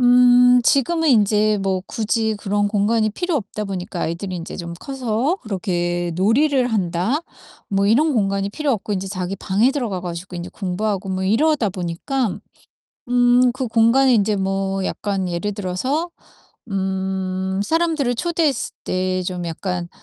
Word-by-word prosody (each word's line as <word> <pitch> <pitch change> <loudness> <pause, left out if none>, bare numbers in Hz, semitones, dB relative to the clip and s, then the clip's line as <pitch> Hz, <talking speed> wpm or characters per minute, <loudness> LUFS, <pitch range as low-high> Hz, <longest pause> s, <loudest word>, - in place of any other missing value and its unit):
음 245 0 +6
지금은 320 +6 +2
인제 215 -3 +3
뭐 190 -1 0
굳이 220 0 -1
그런 205 0 0
공간이 215 +2 +2
필요 350 - -2
없다 210 -3 -4
보니까 185 -2 -4
아이들이 180 +3 -3
인제 170 -1 -7
좀 170 -1 -6
커서 265 - -1
그렇게 175 -4 -2
놀이를 250 +6 +2
한다 190 - 0 0.5
뭐 195 0 +1
이런 290 +9 +3
공간이 200 -4 0
필요 295 +4 -1
없고 210 -2 -3
인제 195 0 -2
자기 185 -1 -3
방에 205 +7 +2
들어가 235 -10 -2
가지고 175 +1 -6
인제 175 0 -6
공부하고 195 0 -2
뭐 190 0 -2
이러다 230 +2 +2
보니깐 190 +7 -2 0.7
음 245 0 +4
그 260 -1 -3
공간이 230 +4 +4
인제 210 -1 +2
뭐 195 0 -1
약간 195 -2 -2
예를 175 +4 -2
들어서 235 - -2 0.6
음 190 -1 -2
사람들을 315 -2 0
초대했을 320 -4 0
때 185 0 -1
좀 180 -1 -4
약간 175 +1 -3
205 Hz, 305 characters per minute, -21 LUFS, 185-245 Hz, 0.7 s, 음